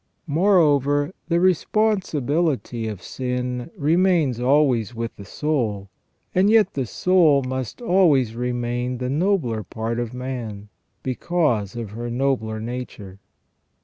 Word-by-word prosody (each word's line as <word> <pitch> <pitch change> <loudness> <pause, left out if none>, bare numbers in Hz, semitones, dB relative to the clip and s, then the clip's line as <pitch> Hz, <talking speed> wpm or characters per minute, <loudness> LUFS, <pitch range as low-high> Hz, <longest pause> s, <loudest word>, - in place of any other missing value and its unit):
Moreover, 145 -3 +3
the 170 0 +2
responsibility 170 - +1
of 105 -5 -6
sin 125 0 -3
remains 160 -4 +2
always 125 -3 +2
with 115 0 -4
the 100 - -11
soul, 110 -7 -2 0.4
and 190 +3 +4
yet 220 -1 +4
the 135 -3 -2
soul 160 - +3
must 130 - -5
always 155 - +3
remain 120 +1 -2
the 125 +1 -3
nobler 155 - 0
part 115 +2 -4
of 120 -2 -3
man, 120 -5 -6 0.3
because 130 - 0
of 115 -4 -5
her 120 +2 -5
nobler 120 -3 -1
nature. 110 -5 -7
130 Hz, 115 wpm, -22 LUFS, 115-160 Hz, 0.4 s, and